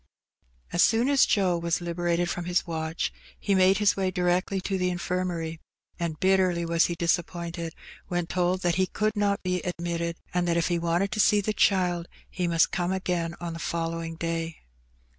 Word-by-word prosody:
As 175 - +4
soon 235 +4 +3
as 280 -2 +5
Joe 185 -4 +2
was 170 0 0
liberated 175 0 -1
from 175 0 -3
his 175 0 +1
watch, 160 -1 -3 0.2
he 200 - 0
made 190 0 +5
his 210 -2 +3
way 190 -1 0
direct 180 0 +1
to 195 - 0
the 180 0 +1
Infirmary, 175 -2 -2 0.4
and 165 -3 -3
bitterly 185 -2 +2
was 170 0 +3
he 170 - -3
disap 170 0 +1
pointed 170 -1 -6 0.3
when 175 -1 -1
told 180 +1 0
that 175 0 +1
he 185 - +2
could 215 +3 -1
not 205 -1 0
be 180 -1 0
admitted, 170 -1 -3 0.2
and 175 0 +1
that 170 0 +2
if 170 - +1
he 175 -1 +1
wanted 170 +4 0
to 215 - -3
see 210 0 +5
the 210 +1 -1
child 180 -4 +2 0.2
he 180 -2 -1
must 165 -1 +3
come 180 -1 -1
again 175 -3 -1
on 170 -1 -4
the 165 - -7
following 165 0 -3
day. 165 -1 -3
175 Hz, 190 wpm, -27 LUFS, 170-185 Hz, 0.4 s, as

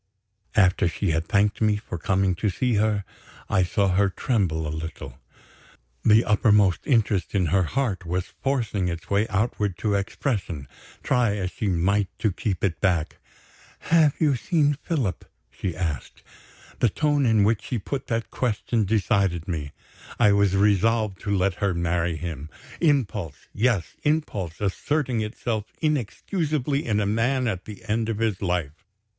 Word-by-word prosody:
After 90 -4 +4
she 80 - -1
had 80 +1 -1
thanked 100 +2 +2
me 110 -1 +3
for 95 -5 -7
coming 95 +2 +1
to 105 +3 0
see 125 +7 0
her, 105 -2 +1 0.4
I 95 - +2
saw 95 +2 +1
her 100 +2 +3
tremble 95 -7 0
a 75 - -3
little. 80 +1 -7 0.8
The 110 +2 +5
uppermost 105 -3 +4
interest 105 -7 +1
in 95 -2 +2
her 95 - +4
heart 100 - -1
was 90 +2 -3
forcing 115 -9 0
its 85 +1 -5
way 100 +2 +2
outward 105 -3 -1
to 105 +1 0
expression, 100 - -2 0.4
try 120 -5 +2
as 95 -3 -3
she 110 -5 -3
might 95 +3 +2
to 110 - +1
keep 95 0 -3
it 90 -5 0
back. 90 -5 +1 0.8
"Have 155 -4 +5
you 150 -4 +2
seen 145 +2 +2
Philip?" 130 - -2 0.3
she 90 -4 -4
asked. 80 -6 -4 0.6
The 120 - +4
tone 145 - +1
in 110 -3 +4
which 110 +1 +2
she 125 - -3
put 130 +6 -4
that 115 -2 -2
question 115 -2 0
decided 100 -5 +1
me 75 -5 -3 0.5
I 105 -3 +6
was 100 -1 +3
resolved 105 0 +2
to 105 - -5
let 95 0 +2
her 100 -3 +1
marry 85 0 0
him. 80 -2 -6 0.3
Impulse! 110 - 0
Yes, 105 - +1
impulse, 105 - -1
asserting 125 +5 0
itself 110 0 -3
inexcusably 150 - -1
in 105 -2 +1
a 105 - +1
man 120 +5 +1
at 95 -5 -3
the 105 -2 -10
end 110 +1 0
of 110 - -1
his 110 -4 -1
life. 85 -5 -2
105 Hz, 155 wpm, -25 LUFS, 90-115 Hz, 0.8 s, I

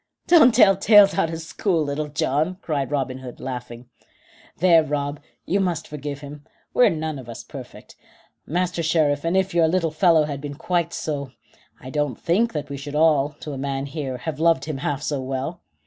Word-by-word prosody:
"Don't 310 -9 +6
tell 200 -5 +6
tales 200 0 +6
out 195 -4 +1
of 165 0 -5
school, 165 0 -1
Little 145 +1 -3
John," 150 +4 -1
cried 145 -4 -2
Robin 135 -3 -2
Hood, 125 -2 -10
laughing. 125 -2 -7 0.7
"There, 170 -2 +5
Rob, 145 -1 -3 0.3
you 195 - +1
must 175 -5 -1
forgive 145 -1 -6
him; 145 0 -10 0.3
we're 250 - +5
none 155 -2 -3
of 120 -2 -11
us 115 - -8
perfect. - - -11 0.5
Master 175 +1 -1
Sheriff, 155 -3 +1
and 170 +3 +1
if 190 -1 0
your 170 -2 +4
little 165 -1 0
fellow 160 0 +4
had 145 -2 -4
been 145 -1 -6
quite 170 +2 -1
so, 140 -4 -4 0.5
I 130 -4 -9
don't 145 -4 -1
think 205 +7 +1
that 150 -2 -4
we 140 -1 -6
should 145 +1 -7
all, 150 -2 +3
to 150 - -6
a 135 - -6
man 135 0 -2
here, 140 -3 -4
have 150 +4 -5
loved 165 -4 +3
him 155 -3 -4
half 145 +1 -3
so 145 -3 -2
well. 135 +6 -4
150 Hz, 195 wpm, -23 LUFS, 140-170 Hz, 0.7 s, Don't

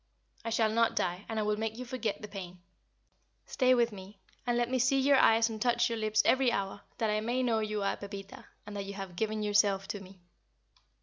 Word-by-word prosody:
I 230 - -3
shall 225 -1 +2
not 230 +1 +2
die, 180 +3 -1
and 225 - -3
I - - +1
will 210 0 0
make 220 0 -3
you 255 - -6
forget 235 -4 -3
the - - -5
pain. 185 -3 -8 0.9
Stay 255 -1 +3
with 235 -1 +2
me, 195 0 -11 0.3
and 240 0 +2
let 240 0 +1
me 255 +1 0
see 260 +3 +3
your 275 +1 +5
eyes 225 0 +5
and 220 -2 -6
touch 240 0 +2
your 230 - -1
lips 215 0 +2
every 260 -2 +4
hour, 200 -2 -3 0.2
that 220 -2 0
I 215 0 0
may 245 +3 0
know 230 -3 +2
you 215 -1 -2
are 195 - 0
Pepita, 200 -1 -9 0.2
and 210 0 -8
that 200 -1 -4
you 200 0 -7
have 195 -3 -7
given 215 +2 -1
yourself 205 -2 +2
to 205 - -3
me." 190 0 -14
215 Hz, 230 wpm, -31 LUFS, 200-235 Hz, 0.9 s, your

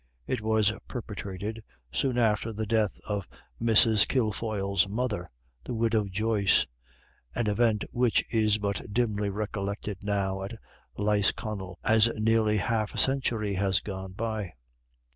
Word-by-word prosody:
It 125 - -2
was 110 -1 +2
perpetrated 105 -1 -5 0.3
soon 125 - 0
after 115 -1 +2
the 110 0 -3
death 110 -1 +1
of 100 -3 -2 0.3
Mrs. 110 -3 +5
Kilfoyle's 105 -5 0
mother, 105 -5 -2 0.3
the 120 - -4
Widow 110 -2 +2
Joyce, 100 0 +2 0.7
an 120 - 0
event 105 0 +2
which 120 -2 +2
is 110 -2 +3
but 100 -4 -1
dimly 105 -3 0
recollected 100 -1 -3
now 100 -2 -1
at 95 - -5 0.4
Lisconnel, 105 -2 0
as 110 +1 +5
nearly 110 -1 +3
half 110 +2 -1
a - - -5
century 120 -6 +1
has 95 0 +2
gone 95 -2 -6
by. 110 -3 -3
105 Hz, 125 wpm, -28 LUFS, 100-115 Hz, 0.7 s, Mrs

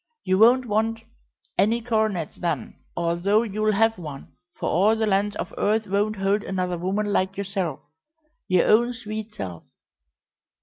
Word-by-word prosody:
You 185 +1 +1
won't 245 +3 +6
want 225 +1 0 0.6
any 225 +3 +3
coronets 220 -8 -1
then, 165 -9 -2 0.2
although 175 +6 +2
you'll 215 0 0
have 225 0 +2
one, 150 -5 -8 0.3
for - - -3
all 205 +6 +3
the 220 0 0
lands 205 0 +1
of - - -5
earth 215 +1 +1
won't 205 +2 0
hold 195 +1 +1
another 185 -2 -2
woman 200 +3 -1
like 190 +1 0
yourself 195 -6 -3 0.7
your 185 -2 +3
own 240 +3 +4
sweet 220 -2 -7
self! 90 -4 -6
205 Hz, 145 wpm, -24 LUFS, 185-220 Hz, 0.7 s, won't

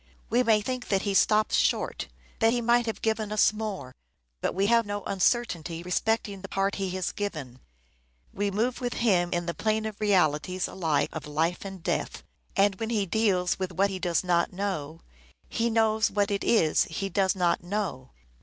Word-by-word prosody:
We 240 +2 +4
may 220 -3 +3
think 255 +3 -4
that 195 -2 +1
he 200 - -1
stops 215 +3 +3
short: - - 0 0.3
that 225 0 +4
he 245 - +1
might 240 0 +2
have 225 - -4
given 220 -1 0
us 215 0 +4
more; 200 -12 -5 0.5
but - - -1
we 195 +1 +2
have 230 +2 +4
no 205 -1 -3
uncertainty 180 -5 0
respecting 200 +2 -1
the 195 - -7
part 195 +1 0
he 190 - -1
has 185 - -1
given. 155 -11 -5 0.7
We 205 +1 -1
move 235 +6 -1
with 245 -1 -2
him 185 -7 +2
in 175 -1 -1
the 170 - -2
plane 220 +2 0
of 215 -1 -6
realities 180 -3 +2
alike 165 -6 0
of 155 -3 -6
life 160 +4 -1
and 190 -3 -8
death: - - -2 0.3
and 195 -1 +3
when 225 - -2
he 215 -4 +1
deals 190 -3 +1
with 185 -1 -2
what 195 +3 +2
he 190 - -4
does 175 -1 0
not 175 -1 +1
know, 175 -5 -4 0.5
he 230 +1 0
knows 220 -1 +2
what 205 0 0
it 200 - -1
is 165 -10 +3
he 195 +4 -4
does 190 0 +1
not 175 -2 +1
know. 175 -9 -3
195 Hz, 190 wpm, -27 LUFS, 175-220 Hz, 0.7 s, We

